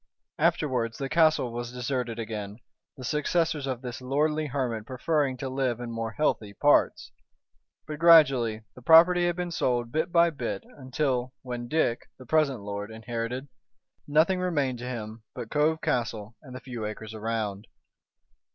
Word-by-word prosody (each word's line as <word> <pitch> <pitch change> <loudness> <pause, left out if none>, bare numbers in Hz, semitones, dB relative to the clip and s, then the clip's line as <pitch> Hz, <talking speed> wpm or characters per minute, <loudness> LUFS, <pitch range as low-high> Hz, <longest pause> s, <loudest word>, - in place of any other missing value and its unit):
Afterwards 120 -5 +1
the 135 -1 -4
castle 155 -6 +3
was 120 0 -4
deserted 125 -2 -3
again, 105 -2 -5 0.4
the 130 - -9
successors 150 +2 0
of 130 -1 -4
this 125 0 -6
lordly 150 +4 0
hermit 125 -6 -3
preferring 140 0 0
to 135 - -4
live 130 -2 -1
in 120 -1 -5
more 115 0 -4
healthy 110 -8 -1
parts. 145 0 +2 0.7
But 150 -1 -6
gradually 135 -10 +5
the 125 - -14
property 175 +5 +6
had 175 - 0
been 180 -1 -3
sold 120 -6 0
bit 160 +4 -1
by 170 0 +5
bit, 155 - -4
until, 130 -2 -2
when 120 -1 -5
Dick, 125 -5 0
the 130 - -13
present 140 -4 +1
lord, 100 +1 -5
inherited, 115 +4 -4 0.6
nothing 160 +6 +3
remained 145 -9 0
to 125 +1 -5
him 110 -2 -6
but 120 -3 -7
Cove 155 +2 +2
Castle 115 -2 -2
and 130 -4 -11
the 130 - -7
few 120 -4 -6
acres 110 +1 -6
around. 110 -2 -3
125 Hz, 155 wpm, -27 LUFS, 115-150 Hz, 0.7 s, property